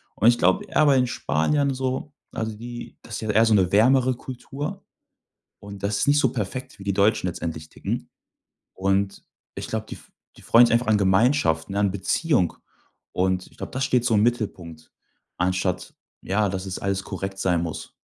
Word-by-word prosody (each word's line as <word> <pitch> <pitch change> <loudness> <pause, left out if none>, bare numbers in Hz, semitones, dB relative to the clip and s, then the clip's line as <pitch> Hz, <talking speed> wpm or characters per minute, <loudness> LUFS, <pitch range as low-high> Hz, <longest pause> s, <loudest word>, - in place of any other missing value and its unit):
Und 110 - +3
ich 120 0 +6
glaube, 95 +2 +2
e - - -15
aber 145 -3 +5
in 125 -1 +3
Spanien 135 - 0
so, 130 +3 -3 0.2
also 110 -1 -4
die 120 +2 -8
das 115 - -8
ist - - -5
ja 110 - -4
eher 110 +2 +5
so 110 - +3
'ne 95 -3 +3
wärmere 125 +4 +4
Kultur, 135 +4 -7 0.7
und 100 -1 -10
das 100 +1 0
es - - +1
nicht 145 +1 +5
so - - +3
perfekt 130 +3 -5
wie - - -9
die 100 -1 -1
Deutschen 100 -1 +2
letztendlich 80 -3 -5
ticken. - - -5 0.7
Und 95 +1 0 0.3
ich - - -6
glaube, - - -3
die - - -6
f - - -17 0.3
die - - -16
freuen 120 +1 +6
sich - - -1
einfach 120 0 +2
an 110 -1 +4
Gemeinschaft, 95 - +2
ne? 100 - -2
An 100 - +2
Beziehung 100 - +1 0.6
und 95 0 0
ich - - -23
glaube, - - -7
das 130 +1 -1
steht 125 -2 +2
so 120 - +2
im 105 - +4
Mittelpunkt, 95 -9 -2 0.5
anstatt, 90 0 -1 0.3
ja, 105 +2 +1
dass 95 +1 -4
es 95 - -4
alles 100 -1 -1
korrekt 95 0 -5
sein 85 -2 +1
muss. 80 -2 -5
105 Hz, 195 wpm, -24 LUFS, 95-125 Hz, 0.7 s, ich